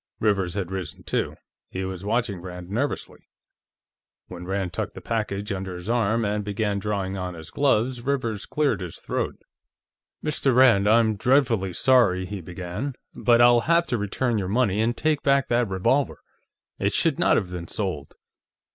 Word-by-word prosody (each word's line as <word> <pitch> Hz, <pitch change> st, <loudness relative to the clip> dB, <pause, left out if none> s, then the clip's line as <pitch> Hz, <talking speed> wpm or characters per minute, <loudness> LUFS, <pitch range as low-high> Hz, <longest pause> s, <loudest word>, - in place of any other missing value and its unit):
Rivers 100 Hz, -4 st, +1 dB
had 95 Hz, -3 st, -3 dB
risen, 95 Hz, -5 st, -6 dB
too; -, -, -2 dB, 0.3 s
he 95 Hz, 0 st, -4 dB
was 95 Hz, 0 st, -6 dB
watching 105 Hz, -3 st, -1 dB
Rand 90 Hz, 0 st, -8 dB
nervously. 135 Hz, +8 st, -3 dB, 1.0 s
When 90 Hz, -1 st, -8 dB
Rand 95 Hz, -1 st, -2 dB
tucked -, -, -4 dB
the -, -, -7 dB
package 105 Hz, -2 st, -3 dB
under 95 Hz, -1 st, -4 dB
his 90 Hz, +5 st, -4 dB
arm 115 Hz, -1 st, +1 dB
and 105 Hz, 0 st, -1 dB
began 105 Hz, 0 st, -1 dB
drawing 100 Hz, -1 st, -2 dB
on 90 Hz, -1 st, -4 dB
his 80 Hz, -1 st, -10 dB
gloves, 130 Hz, -3 st, +1 dB
Rivers 120 Hz, -5 st, -2 dB
cleared 150 Hz, -8 st, 0 dB
his 90 Hz, -3 st, -6 dB
throat. -, -, -3 dB, 0.9 s
"Mr. 140 Hz, -4 st, +1 dB
Rand, 120 Hz, -6 st, +6 dB
I'm 110 Hz, -1 st, +4 dB
dreadfully 120 Hz, -7 st, +2 dB
sorry," 105 Hz, -6 st, +3 dB
he 100 Hz, 0 st, -6 dB
began, 90 Hz, -, -5 dB, 0.2 s
"but 120 Hz, -1 st, +3 dB
I'll 120 Hz, 0 st, +7 dB
have 170 Hz, 0 st, +4 dB
to 120 Hz, -, +1 dB
return 110 Hz, +3 st, -1 dB
your 95 Hz, -2 st, -3 dB
money 110 Hz, -2 st, +2 dB
and 120 Hz, +2 st, 0 dB
take 155 Hz, -2 st, +1 dB
back 140 Hz, -1 st, +2 dB
that 120 Hz, -2 st, +2 dB
revolver. 115 Hz, +9 st, +1 dB, 0.6 s
It -, -, 0 dB
should -, -, +2 dB
not -, -, +4 dB
have 90 Hz, -, -2 dB
been 85 Hz, -1 st, -6 dB
sold." 95 Hz, -, -4 dB
105 Hz, 165 wpm, -25 LUFS, 95-120 Hz, 1.0 s, I'll